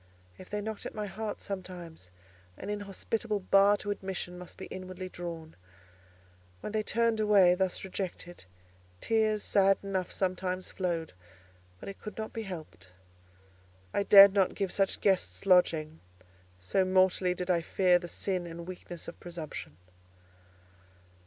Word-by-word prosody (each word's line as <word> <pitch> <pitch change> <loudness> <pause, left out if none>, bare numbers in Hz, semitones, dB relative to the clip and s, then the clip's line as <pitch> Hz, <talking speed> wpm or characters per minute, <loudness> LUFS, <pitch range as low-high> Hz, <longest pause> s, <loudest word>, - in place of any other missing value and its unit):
If 185 - -12
they 210 0 -2
knocked 220 0 -5
at - - -10
my 210 -1 -3
heart 205 +2 -5
sometimes, 180 - -7 0.5
an 205 - -5
inhospitable 210 +2 -2
bar 200 +2 +5
to 205 0 -4
admission 190 -2 -4
must 180 -1 -10
be - - -7
inwardly 185 0 -7
drawn. 165 -3 -7 1.1
When - - -5
they 215 0 0
turned 230 +1 +1
away 200 -4 +6
thus 185 0 -1
rejected, 180 - -6 0.5
tears 215 - +1
sad 195 -1 +4
enough 190 -2 -2
sometimes 185 0 -2
flowed: 170 -4 -2 0.7
but - - -10
it 195 - -8
could 210 - -8
not 220 0 -5
be 225 - -3
helped: 160 - -8 1.1
I - - +2
dared 200 -1 +9
not 195 -2 +2
give 195 -3 -2
such 195 -1 0
guests 195 0 +1
lodging. 165 -4 +3 0.6
So 95 - +1
mortally 185 -1 +3
did 180 0 -1
I 170 -1 +2
fear 180 +1 +3
the 175 - -7
sin 180 0 -2
and 170 +1 -8
weakness 175 -2 -8
of - - -9
presumption. 160 - -7
185 Hz, 145 wpm, -30 LUFS, 175-200 Hz, 1.1 s, dared